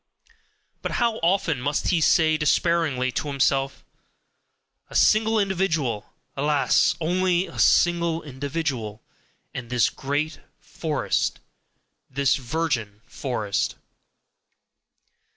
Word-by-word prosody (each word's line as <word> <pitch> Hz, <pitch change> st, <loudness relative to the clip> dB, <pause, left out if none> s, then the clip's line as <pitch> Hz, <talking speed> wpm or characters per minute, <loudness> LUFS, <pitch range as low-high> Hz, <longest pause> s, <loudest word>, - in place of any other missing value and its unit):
But -, -, -3 dB
how 235 Hz, -2 st, +1 dB
often 165 Hz, -, +1 dB
must 145 Hz, +3 st, -1 dB
he 170 Hz, -3 st, +2 dB
say 155 Hz, 0 st, +4 dB
despairingly 150 Hz, -4 st, +1 dB
to 150 Hz, -, -3 dB
himself: 135 Hz, -1 st, 0 dB, 1.0 s
"A -, -, -11 dB
single 220 Hz, +1 st, +4 dB
individual! 165 Hz, -, -1 dB, 0.2 s
alas, 145 Hz, +1 st, +2 dB
only 180 Hz, +2 st, +1 dB
a -, -, -10 dB
single 170 Hz, -1 st, +3 dB
individual! 130 Hz, -6 st, -4 dB, 0.5 s
and 120 Hz, -2 st, -6 dB
this 125 Hz, -3 st, +2 dB
great 145 Hz, +3 st, -3 dB, 0.2 s
forest, 155 Hz, -4 st, -2 dB, 0.7 s
this 135 Hz, -1 st, +1 dB
virgin 125 Hz, -7 st, -2 dB
forest!" 110 Hz, -7 st, -2 dB
150 Hz, 95 wpm, -24 LUFS, 130-170 Hz, 1.0 s, say